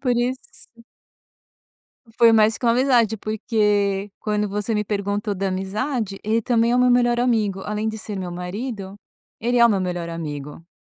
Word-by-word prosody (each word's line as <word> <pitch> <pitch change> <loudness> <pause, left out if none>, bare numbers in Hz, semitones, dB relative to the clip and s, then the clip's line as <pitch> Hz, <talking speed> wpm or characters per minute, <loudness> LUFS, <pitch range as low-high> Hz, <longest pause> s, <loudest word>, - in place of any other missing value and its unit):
Por 250 -3 +1
isso 240 -1 -4 1.3
Foi 235 -1 +6
mais 220 0 +4
que - - -8
uma 235 - +5
amizade, 240 -3 +3
porque 210 -2 0
quando 210 -1 -1
você 210 +2 -2
me 210 - 0
perguntou 205 0 -2
da 195 +1 -2
amizade, 200 +3 -3
ele 220 +2 +1
também 230 0 +2
é 245 - +3
o - - +2
meu 250 0 +4
melhor 240 -1 +3
amigo, 215 -6 +1
além 210 +1 -2
de 220 0 -4
ser 210 -1 -6
o - - -4
meu 180 -1 -5
marido, 195 +3 -5 0.4
ele 240 +2 +1
é 235 - +7
o - - +2
meu 200 -4 +1
melhor 175 -2 -3
amigo. 150 -1 -6
210 Hz, 185 wpm, -22 LUFS, 195-235 Hz, 1.3 s, é